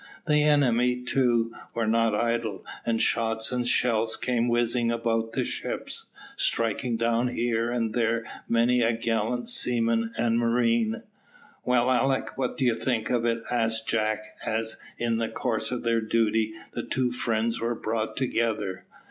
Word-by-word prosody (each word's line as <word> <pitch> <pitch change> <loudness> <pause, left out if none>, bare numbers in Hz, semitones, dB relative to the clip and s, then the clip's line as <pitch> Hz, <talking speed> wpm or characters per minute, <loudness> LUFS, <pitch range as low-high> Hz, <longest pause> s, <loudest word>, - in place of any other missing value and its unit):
The 150 -2 +4
enemy, 125 -4 +3
too, 120 -3 +1 0.2
were 115 -1 0
not 115 0 +2
idle, 115 -2 -1 0.2
and 115 -1 +1
shots 110 0 +1
and 125 -1 -1
shell 115 -2 +2
came 120 -1 +1
whizzing 120 0 +1
about 115 -1 -1
the - - 0
ships, - - -3 0.3
striking 115 +1 0
down 115 +1 +1
here 120 -1 0
and 115 -2 -1
there 115 -1 +1 0.2
many 120 +2 +3
a 115 0 +3
gallant 115 +1 -1
seaman 115 -2 +1
and 115 0 +2
marine. 115 -1 +1 0.6
"Well, 125 0 +2
Alick, 135 +1 +1
what 130 -2 -2
do 130 - +1
you 120 - +4
think 115 -1 -1
of 120 -2 +1
it?" 115 0 0
asked 115 -2 0
Jack, 110 -1 0 0.2
as, 110 0 -2 0.2
in 115 -1 0
the 115 -1 -1
course 115 -3 -2
of 125 -1 -3
their 115 -1 +2
duty, 110 0 +1 0.2
the 120 - -2
two 125 +1 -1
friends 115 -2 -1
were 120 +1 0
brought 110 0 -3
together. 110 -7 -1
115 Hz, 155 wpm, -27 LUFS, 115-120 Hz, 0.6 s, The